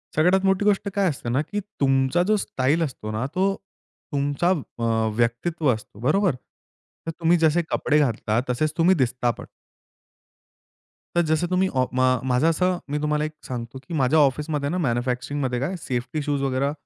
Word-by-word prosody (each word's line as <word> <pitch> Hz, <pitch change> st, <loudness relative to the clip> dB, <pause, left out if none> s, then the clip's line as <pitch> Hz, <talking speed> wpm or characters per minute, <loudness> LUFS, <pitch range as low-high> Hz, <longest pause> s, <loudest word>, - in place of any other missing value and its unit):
सगळ्यात 180 Hz, +5 st, +3 dB
मोठी 195 Hz, +1 st, +2 dB
गोष्ट 205 Hz, 0 st, +2 dB
काय 200 Hz, -1 st, +2 dB
असते 135 Hz, -5 st, -5 dB
ना, 130 Hz, +4 st, +1 dB
की 205 Hz, +7 st, -4 dB, 0.2 s
तुमचा 135 Hz, +4 st, +2 dB
जो 215 Hz, -, +4 dB
स्टाईल 145 Hz, -3 st, 0 dB
असतो 125 Hz, -7 st, -5 dB
ना, 110 Hz, +3 st, -2 dB
तो 195 Hz, +1 st, +2 dB, 0.6 s
तुमचा 145 Hz, +4 st, 0 dB, 0.3 s
अ 115 Hz, -1 st, +1 dB
व्यक्तित्व 125 Hz, +7 st, 0 dB
असतो. 110 Hz, -2 st, -10 dB
बरोबर? 180 Hz, -, +2 dB, 0.7 s
तर 165 Hz, -, -2 dB
तुम्ही 170 Hz, +1 st, +4 dB
जसे 165 Hz, +1 st, +3 dB
कपडे 150 Hz, 0 st, +2 dB
घातला, 115 Hz, -5 st, +1 dB
तसेच 150 Hz, +5 st, 0 dB
तुम्ही 175 Hz, +3 st, +4 dB
दिसता 125 Hz, -4 st, +1 dB
पण. -, -, -10 dB, 1.7 s
तर 175 Hz, -, +4 dB
जसं 160 Hz, +2 st, +1 dB
तुम्ही 185 Hz, +1 st, +2 dB
अ, 130 Hz, 0 st, +3 dB
मा 130 Hz, 0 st, +3 dB
माझं 130 Hz, +4 st, +2 dB
असं 180 Hz, +2 st, +1 dB
मी 150 Hz, -, 0 dB
तुम्हाला 150 Hz, 0 st, 0 dB
एक 155 Hz, -, -4 dB, 0.2 s
सांगतो, 120 Hz, 0 st, -6 dB
की -, -, -7 dB
माझ्या 150 Hz, +1 st, +3 dB
ऑफिसमध्ये 145 Hz, +1 st, +1 dB
ना, 175 Hz, -, -1 dB
मॅन्युफॅक्चरिंगमध्ये 125 Hz, -1 st, -1 dB
काय 150 Hz, +9 st, -2 dB
सेफ्टी 130 Hz, +4 st, -3 dB
शूज 145 Hz, -1 st, -1 dB
वगैरे 135 Hz, +1 st, 0 dB
145 Hz, 165 wpm, -24 LUFS, 125-170 Hz, 1.7 s, जो